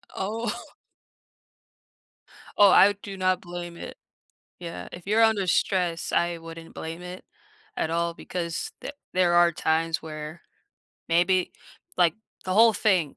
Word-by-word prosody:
Oh 220 +5 -4 1.8
Oh, 205 -1 +8
I 205 +2 +7
do 195 -2 -7
not 185 0 +1
blame 175 -1 -7
it. - - -8 0.6
Yeah, 170 -1 -7
if 175 +1 -10
you're 220 +3 +3
under 220 -4 +3
stress, 175 -1 0
I 170 -1 +1
wouldn't 165 0 -11
blame 165 +2 -6
it 180 +1 -9 0.5
at 160 - -1
all, 170 0 -1
because 170 -1 -4
th - - -6 0.2
there 180 -1 +3
are 175 0 +5
times 160 +1 0
where, 155 +1 -8 0.7
maybe 180 +2 +2 0.4
like, 170 -3 +4 0.3
the 185 - -2
whole 225 +1 +7
thing, 185 -9 +1
175 Hz, 130 wpm, -26 LUFS, 165-190 Hz, 1.8 s, Oh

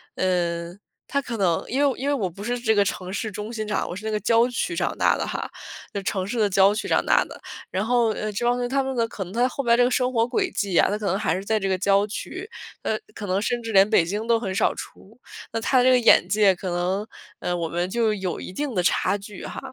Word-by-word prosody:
嗯， 175 -1 -1 0.3
他 280 +1 0
可 240 -3 -5
能 180 -4 +1
因 275 +4 +1
为 265 - -1
因 275 - -2
为 290 - +2
我 210 -10 -1
不 195 +4 -10
是 245 +2 -1
这 220 -2 +2
个 200 -1 +4
城 185 -1 -4
市 210 +2 -3
中 210 +3 -6
心 215 -2 -4
长 210 - -1
我 - - -4
是 215 +3 -8
那 220 - -1
个 210 - +1
郊 230 +3 +4
区 295 +8 -2
长 - - -1
大 - - +3
的 - - -2
哈， - - -4 0.4
那 200 - -3
城 190 -1 -1
市 230 +2 -3
的 210 -2 +3
郊 195 +1 +5
区 210 - -3
长 - - +2
大 - - +4
的。 - - -11 0.3
然 190 +3 -1
后， 240 -1 +3
呃， 215 0 -3
这 225 +4 -2
帮 240 - +4
同 245 - -3
学 245 - -2
他 275 +1 +1
们 265 -1 -3
的 230 -1 +1
可 200 -3 -5
能 185 +2 -11
他 245 +2 +3
后 275 - -4
边 235 -2 +3
儿 - - +5
这 245 - +5
个 245 - +3
生 255 0 +1
活 230 -1 +3
轨 380 - 0
迹 195 -4 -1
啊， - - +4
他 205 - -1
可 210 - -6
能 190 +1 +1
还 210 -1 0
是 190 - -4
在 220 0 +1
这 195 - -2
个 190 - +1
郊 200 +1 +3
区， 370 - -6 0.3
呃， 220 - 0 0.2
可 210 - -6
能 185 +2 0
甚 240 +2 -1
至 225 - -4
连 195 +1 +5
北 175 -7 +4
京 205 +5 -3
都 230 -1 +3
很 195 -4 -3
少 210 - +2
出， 220 +5 -11 0.3
那 225 - 0
他 255 +1 +3
这 255 - +5
个 250 -1 +5
眼 235 - +5
界 205 -3 +4
可 185 +1 -5
能 180 +4 -1 0.3
呃， 180 - -2
我 170 -1 -2
们 175 +2 -2
就 225 0 +1
有 190 -4 -3
一 - - -8
定 285 +4 -3
的 180 - +2
差 200 - +2
距 200 0 -10
哈。 - - -6
210 Hz, 305 characters per minute, -24 LUFS, 190-240 Hz, 0.4 s, 郊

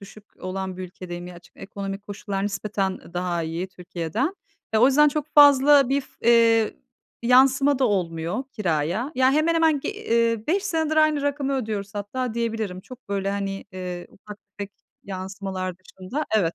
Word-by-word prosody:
düşük 200 +1 -13 0.2
olan 185 0 -4
bir 185 - -6
ülkedeyim. 175 -1 -8
Gerçi 175 -1 -12
ekonomik 195 0 -6
koşullar 200 -1 -4
nispeten 200 -1 -2
daha 175 -1 -1
iyi 165 +3 -3
Türkiye'den. 185 - -3 0.4
E, 220 - +3
o 240 - +7
yüzden 295 +3 +5
çok 295 0 -2
fazla 285 -2 +7
bir 275 +1 +2
f 265 - -16
eee, 230 -1 +4 0.5
yansıma 265 +3 +5
da 270 - +3
olmuyor 175 +1 -1
kiraya. 180 - -1
Ya, 260 +1 +4
hemen 310 +3 +2
hemen 320 -3 +3
g - - -4
eee, 230 - 0
5 380 +5 +1
senedir 320 -5 0
aynı 310 -2 +4
rakamı 285 -1 -1
ödüyoruz 210 -5 -4
hatta 220 +4 -3
diyebilirim. 225 -5 -2
Çok 250 +2 -14
böyle, 195 -1 -1
hani, 195 -1 -3
eee, 180 -1 -6
ufak 210 +1 -12 0.2
tefek 200 0 -5 0.3
yansımalar 190 -1 -5
dışında. 190 +10 -6
Evet. 170 -5 +1
210 Hz, 160 wpm, -24 LUFS, 185-270 Hz, 0.5 s, o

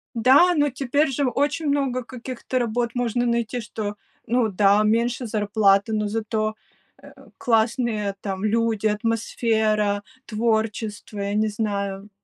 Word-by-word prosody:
Да, 255 +6 +6 0.2
но 290 0 +3
теперь 275 +3 0
же 275 +2 0
очень 290 +5 -1
много 275 -3 0
каких-то 255 +2 -5
работ 235 0 -1
можно 245 0 0
найти, 235 0 -1
что 210 -2 -5 0.3
ну 235 -1 +2
да, 200 +1 +4
меньше 235 +3 +1
зарплата, 205 -1 +2
но 210 -1 0
зато, 215 0 -2 0.5
э, - - -14 0.3
классные 225 -3 0
там 195 -1 -4
люди, 220 0 +1
атмосфера, 215 -1 0 0.2
творчество, 220 -1 -2
я 200 0 -2
не 215 +1 +2
знаю. 200 -2 -3
220 Hz, 125 wpm, -23 LUFS, 210-240 Hz, 0.5 s, Да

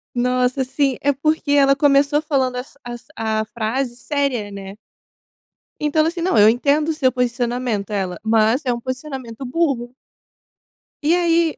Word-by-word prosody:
Nossa, 250 +2 +1
sim, 270 0 0
é 285 - +3
porque 300 +2 -1
ela 275 -1 +5
começou 285 +1 +3
falando 265 -5 0
as 265 +2 -8
as 240 0 -8
a 220 -1 -1
frase 240 +3 -3
séria, 255 -6 -2
né. 195 0 -8 1.0
Então, 300 +1 0
ela 315 - +2
assim: 340 0 -6
"Não, 360 -9 +1
eu 210 +1 +7
entendo 285 +6 +2
o 320 - +1
seu 265 -4 +2
posicionamento", 245 -3 -1
ela, 185 -4 -2
"mas 225 +4 +3
é 245 - +1
um 235 - -4
posicionamento 255 -1 -6
burro". 255 -4 -1 1.1
E 310 +3 +3
aí 335 -2 +2
255 Hz, 155 wpm, -20 LUFS, 235-290 Hz, 1.1 s, eu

